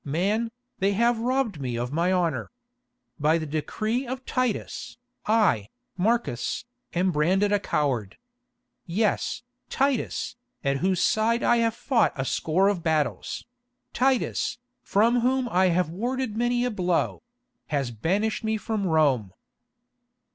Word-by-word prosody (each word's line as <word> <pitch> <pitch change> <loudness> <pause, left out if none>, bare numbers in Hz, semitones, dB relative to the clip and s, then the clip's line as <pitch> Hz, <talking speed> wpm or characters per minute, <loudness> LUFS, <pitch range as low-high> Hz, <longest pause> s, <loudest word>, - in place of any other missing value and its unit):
Man, 200 +10 0 0.3
they 195 +1 +2
have 235 +3 +2
robbed 240 - 0
me 125 -3 -2
of 120 +2 -3
my 170 +3 +2
honour. 160 - 0 0.7
By 155 +3 +3
the 160 - -3
decree 215 - -2
of 260 +1 -5
Titus, 255 -5 -2 0.3
I, 210 - +3 0.3
Marcus, 195 - 0 0.3
am 185 +2 +2
branded 185 +7 +2
as 205 - +4
a - - -6
coward. 125 - -1 0.7
Yes, 210 +6 0 0.3
Titus, 270 -2 0 0.3
at 140 0 +1
whose 185 +4 +1
side 230 +2 +2
I 240 - +4
have 230 -1 +1
fought 235 -4 +2
a 135 - -2
score 175 +8 +2
of 200 -4 +1
battles—Titus, 245 - -1 0.2
from 230 +4 +3
whom 255 +1 +1
I 185 -2 +3
have 175 -2 +1
warded 240 +4 -2
many 240 +1 +1
a 250 - 0
blow—has 180 - -2
banished 195 - 0
me 220 0 0
from 215 -2 -2
Rome." 140 - +2
200 Hz, 130 wpm, -26 LUFS, 160-240 Hz, 0.7 s, as